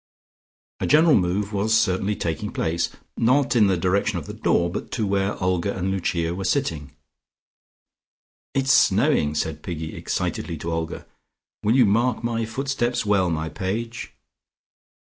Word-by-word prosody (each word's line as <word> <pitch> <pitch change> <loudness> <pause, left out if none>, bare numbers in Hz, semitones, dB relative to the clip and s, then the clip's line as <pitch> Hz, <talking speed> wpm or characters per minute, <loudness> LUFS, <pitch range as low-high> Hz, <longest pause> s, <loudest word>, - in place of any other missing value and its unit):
A - - -1
general 155 +2 +5
move 100 +3 0
was 110 +3 +2
certainly 95 +2 0
taking 85 +5 -3
place, 85 +1 -1 0.3
not 130 +3 +2
in 110 -4 +5
the 95 -2 +2
direction 95 +3 +1
of 80 - -5
the - - -7
door, 85 - +1
but 85 - -5
to 110 - 0
where 100 0 0
Olga 90 +1 -1
and 95 +1 -1
Lucia 85 -3 -1
were 95 +2 -4
sitting. 85 - -1 1.6
"It's 135 0 +2
snowing," 75 -10 +3
said 75 0 -2
Piggy 80 -2 -5
excitedly 85 - -3
to 85 +3 -4
Olga. 80 0 -4 0.6
"Will 110 +3 +2
you 130 -3 +6
mark 115 +4 +1
my 115 -1 -1
footsteps 120 0 -1
well, 100 -3 +2
my 80 -1 -2
page?" 115 +7 -4
100 Hz, 145 wpm, -23 LUFS, 85-115 Hz, 1.6 s, you